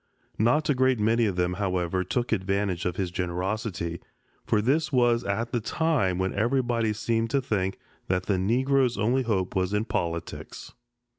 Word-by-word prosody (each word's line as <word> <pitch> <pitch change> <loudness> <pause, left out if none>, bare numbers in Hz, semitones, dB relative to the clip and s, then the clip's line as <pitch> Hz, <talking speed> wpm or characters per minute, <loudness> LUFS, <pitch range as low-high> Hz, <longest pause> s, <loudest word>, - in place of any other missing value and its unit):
Not 125 +8 +3
a 145 - +3
great 130 -2 +2
many 115 +2 +3
of 100 - -2
them, 90 0 0
however, 95 -1 0
took 120 +6 -2
advantage 95 -3 0
of 90 -1 -1
his 90 -2 -2
generosity, 90 0 -3 0.4
for 110 -3 +1
this 140 +9 +1
was 120 -3 +3
at 110 +4 -2
the 120 - +1
time 120 - 0
when 95 0 -1
everybody 120 0 +1
seemed 115 +1 -1
to 140 - +2
think 95 -7 -1 0.3
that 90 -1 0
the 100 -1 0
Negro's 125 +5 +2
only 125 +5 +2
hope 100 -6 -1
was 95 +2 0
in 105 +2 0
politics. 85 -6 -4
105 Hz, 165 wpm, -26 LUFS, 95-120 Hz, 0.4 s, Not